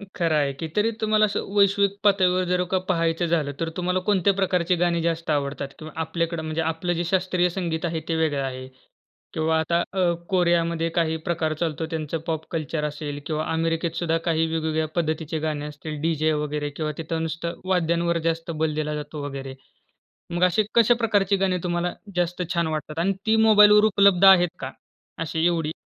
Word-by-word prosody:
खरं 165 -3 +1
आहे 140 -2 +2
की. 160 +4 -6
तरी 215 +2 +2
तुम्हाला 215 0 +3
असं 205 - -2
वैश्विक 200 0 +3
पातळीवर 185 -2 +3
जर 180 0 +2
का 190 - +3
पाहायचं 165 0 0
झालं, 160 -4 0
तर 165 -1 -1
तुम्हाला 180 +1 0
कोणत्या 195 0 +3
प्रकारची 180 -2 +1
गाणी 170 -1 +1
जास्त 165 -1 -2
आवडतात? 140 -2 -1
किंवा 155 -1 -9
आपल्याकडं 165 0 -2
म्हणजे 155 +1 -2
आपलं 165 +2 -1
जे 170 +1 -1
शास्त्रीय 180 0 +1
संगीत 170 -2 -3
आहे 165 -1 -2
ते 165 - +1
वेगळं 155 -4 0
आहे 130 -1 -5 0.7
किंवा 160 0 +1
आता 170 +2 +1
अ, 180 -3 +2 0.2
कोरियामध्ये 170 -2 +1
काही 160 -1 +1
प्रकार 160 -2 0
चालतो, 160 -1 -2
त्यांचं 160 0 -3
पॉप 160 -1 -2
कल्चर 155 -1 -3
असेल 145 -1 -5
किंवा 155 -1 -2
अमेरिकेत 165 +1 0
सुद्धा 165 -1 0
काही 165 -1 +2
वेगवेगळ्या 160 -1 -1
पद्धतीचे 160 -1 -1
गाणे 150 -1 -3
असतील, 150 0 -7
डी-जे 155 -1 +1
वगैरे 150 0 -2
किंवा 155 +1 -3
तिथं 165 0 -3
नुसतं 165 +1 -4
वाद्यांवर 170 -1 +1
जास्त 165 +1 -3
बल 155 -1 -1
दिला 150 0 -2
जातो 150 0 -6
वगैरे. 135 -1 -6 0.8
मग 175 +1 0
अशी 180 +4 +3
कशा 235 +1 +6
प्रकारची 205 -4 +2
गाणी 190 -1 +1
तुम्हाला 175 0 -1 0.2
जास्त 175 0 -1
छान 170 -1 +1
वाटतात? 155 0 -4
आणि 195 +4 +1
ती 220 0 +3
मोबाईलवर 210 0 +7
उपलब्ध 200 -2 +4
आहेत 180 -2 +7
का? 130 0 -5 0.5
अशी 165 +1 -1
एवढी? 165 -2 +1
165 Hz, 180 wpm, -24 LUFS, 155-180 Hz, 0.8 s, मोबाईलवर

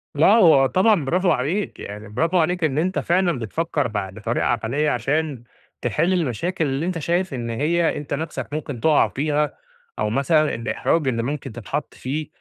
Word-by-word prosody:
لا، 150 +3 +5
هو 175 -10 +6
طبعًا 185 +1 +3
برافوعليك 175 +2 0
يعني 105 +1 -8
برافو 165 - 0
عليك 175 +1 +1
إن 145 -3 +1
أنت 180 +4 +1
فعلًا 175 -4 +1
بتفكر 145 +4 -1
ب - - -10 0.2
بطريقة 110 +3 -2
عقلية 120 +6 0
عشان 140 +1 -1 0.4
تحل 145 - +1
المشاكل 170 - -1
اللي 135 +3 -1
أنت 180 -2 -2
شايف 175 +2 -1
إن 120 -2 -4
هي 160 +8 +1
أنت 145 -1 -5
نفسَك 145 -4 -4
ممكن 145 -5 -4
تقع 155 +1 +4
فيها، 150 +1 -1 0.5
أو - - 0
مثلًا 150 +6 +2
الإحراج 135 +6 0
اللي 115 -3 0
ممكن 145 0 -4
تتحط 115 +5 -5
فيه 150 +4 -4
150 Hz, 165 wpm, -22 LUFS, 125-170 Hz, 0.5 s, هو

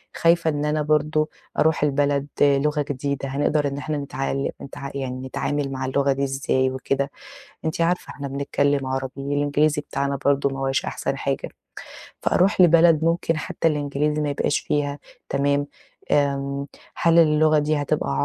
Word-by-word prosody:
خايفة 165 -1 +3
إن 145 0 -1
أنا 150 0 0
برضه 155 +1 +1 0.3
أروح 160 -1 +3
البلد 145 0 +1
لُغة 145 +1 +3
جديدة، 140 0 -3
هنقدر 145 +1 +1
إن 140 0 -4
إحنا 150 +1 -3
نتعال 135 -1 -2
نتعا 140 0 -7
يعني 130 -1 -4
نتعامل 145 +1 -2
مع 130 0 -3
اللغة 140 +1 +1
دي 140 +1 -2
إزاي 130 -1 0
وكده، 135 +1 -2 0.5
أنتِ 165 +2 -1
عارفة 175 +2 0
إحنا 140 -1 -6
بنتكلم 140 0 0
عربي، 130 0 -2
والإنجليزي 145 +2 +1
بتاعنا 140 -1 -2
برضه 140 0 +3
ما 135 0 -6
هواش 135 0 0
أحسن - - -3
حاجة، - - -2 0.7
فأروح 190 +1 +2
لبلد 165 -2 +6
ممكن 165 -1 +1
حتى 165 - -1
الإنجليزي 150 0 -1
ما 145 - -1
يبقاش 140 0 0
فيها 145 -1 -1 0.3
تمام، 140 +1 +1 0.5
آمم 140 -1 0 0.3
هل 170 0 +4
اللغة 155 -1 +5
دي 150 +1 +1
هتبقى 70 - -1
145 Hz, 150 wpm, -23 LUFS, 140-150 Hz, 0.7 s, لبلد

